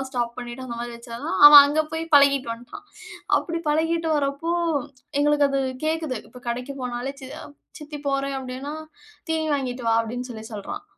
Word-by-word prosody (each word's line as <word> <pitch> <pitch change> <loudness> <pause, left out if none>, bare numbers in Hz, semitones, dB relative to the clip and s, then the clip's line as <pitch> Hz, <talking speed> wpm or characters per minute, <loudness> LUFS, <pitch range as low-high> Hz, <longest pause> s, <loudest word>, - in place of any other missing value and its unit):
அதெல்லாம் 265 - -5
ஸ்டாப் 240 -2 -2
பண்ணிட்டு 245 +1 -7
அந்த 235 - -6
மாரி 240 0 -5
வெச்சா 235 0 -10
தான் 190 - -1
அவன் 290 -1 +12
அங்க 295 +2 +1
போய் 320 0 -2
பழகீட்டு 280 -3 +5
வந்துட்டான். 245 - -11 0.5
அப்டி 335 0 -2
பழகீட்டு 325 +2 0
வர்றப்போ 280 +3 -2 0.7
எங்களுக்கு 295 0 +3
அது 275 0 0 0.3
கேக்குது. 315 -4 -1
இப்போ 250 - -14
கடைக்கு 250 +3 -3
போனாலே, 250 +2 -4
சி 265 - -9 0.5
"சித்தி 300 -1 -8
போறேன்" 275 0 -1
அப்படீன்னா, 260 +2 -6 0.6
"தீனி 320 -1 0
வாங்கிட்டு 255 -3 -3
வா" - - +3
அப்படின்னு 245 +3 -5
சொல்லி 220 -2 -8
சொல்றான். 220 - -6
275 Hz, 170 wpm, -24 LUFS, 245-295 Hz, 0.7 s, அவன்